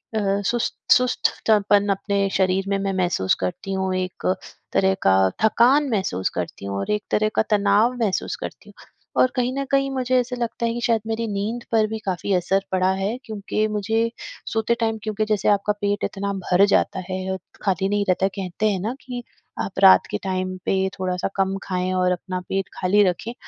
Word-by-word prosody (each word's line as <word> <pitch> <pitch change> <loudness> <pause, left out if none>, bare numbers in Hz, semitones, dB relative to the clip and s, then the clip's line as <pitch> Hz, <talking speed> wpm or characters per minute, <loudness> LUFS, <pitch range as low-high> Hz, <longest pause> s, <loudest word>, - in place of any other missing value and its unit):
अ, - - +2 0.3
सुस्त 240 +3 0 0.2
सुस्तपन 210 -4 +3
अपने 200 0 0
शरीर 190 0 +1
में 200 - +1
मैं 195 0 -1
महसूस 150 - +1
करती 195 - -3
हूँ। 190 -1 -1
एक 185 0 -4 0.5
तरह 190 0 +3
का 95 0 +5 0.3
थकान 260 +6 +4
महसूस 190 - -1
करती 90 +2 -4
हूँ 100 0 -3
और 100 - -2
एक 210 0 0
तरह 215 0 +2
का - - +4
तनाव 210 +3 +3
महसूस 195 -4 -1
करती - - -8
हूँ - - -15 0.5
और 255 - +4
कहीं 250 -1 +1
न 275 +1 -2
कहीं 275 0 +2
मुझे 255 -1 0
ऐसा 250 0 -2
लगता 235 0 -2
है 230 - 0
कि 240 - -4
शायद 230 -2 +2
मेरी 225 +1 -1
नींद 215 +4 -3
पर 220 -2 +3
भी 220 - -4
काफ़ी 190 +1 -1
असर 190 +2 +1
पड़ा 185 0 +2
है 205 +5 -1
क्योंकि 215 0 -2
मुझे 220 +2 0 0.4
सोते 225 +1 +1
टाइम 225 -1 0
क्योंकि 215 0 -1
जैसे 210 -2 +1
आपका 205 0 +2
पेट 205 0 0
इतना 200 0 -2
भर 190 0 +3
जाता 195 -1 +1
है, 190 0 -3 0.3
खाली 195 -1 +1
नहीं 205 0 +1
रहता 185 +1 +2
है, - - +2
कहते 195 +2 -1
हैं 195 -2 -1
ना 225 +5 -2
कि 245 -2 -6 0.4
आप 195 - -4
रात 190 -1 +8
के - - 0
टाइम 185 -1 -2
पे 190 0 +1
थोड़ा-सा 180 -1 -1
कम 195 0 +1
खाएँ 185 0 -2
और 180 0 +2
अपना 185 +1 -3
पेट 195 -1 -1
खाली 200 +3 +3
रखें। 205 +6 -5
200 Hz, 195 wpm, -23 LUFS, 190-220 Hz, 0.5 s, रात